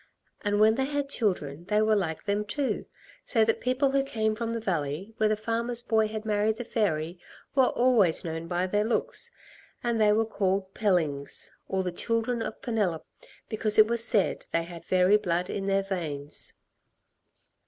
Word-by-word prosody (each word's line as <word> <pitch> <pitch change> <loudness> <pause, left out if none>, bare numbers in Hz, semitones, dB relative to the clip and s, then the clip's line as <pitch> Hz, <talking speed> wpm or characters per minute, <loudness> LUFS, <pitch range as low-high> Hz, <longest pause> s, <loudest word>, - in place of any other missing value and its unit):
"And 205 -1 +1
when 215 +1 +6
they 265 +3 0
had 285 0 -2
children 175 - -2
they 210 +3 +1
were 215 0 +3
like 165 -6 -2
them, 205 +1 0
too, 260 +7 -2 0.4
so 225 -3 +3
that 225 - 0
people 255 +3 +1
who 275 0 +3
came 220 -5 -1
from 230 +1 -3
the 230 - -2
valley 175 0 -3
where 215 - +3
the 215 - +1
farmer's 235 +2 -1
boy 220 -2 +2
had 215 0 -6
married 215 +1 +1
the 245 - -4
fairy 175 -7 -1 0.3
were 265 -2 +4
always 235 -10 +3
known 165 0 -4
by 175 +1 0
their 205 +3 +1
looks, 245 - 0 0.5
and 235 -2 0
they 210 -1 +5
were 220 +2 +3
called 195 -2 -1
Pellings, 160 -9 -1 0.2
or 190 0 -1
the 180 - -2
children 230 +5 -1
of - - -5
Penelop, 205 -9 -1 0.4
because 215 -1 +2
it 215 - +9
was 235 +1 +1
said 215 -4 +1
they 170 - +1
had 170 0 -10
fairy 185 +2 +4
blood 180 -2 -1
in 195 -1 -3
their 195 0 +2
veins." 155 -7 -3
210 Hz, 180 wpm, -28 LUFS, 180-230 Hz, 0.5 s, it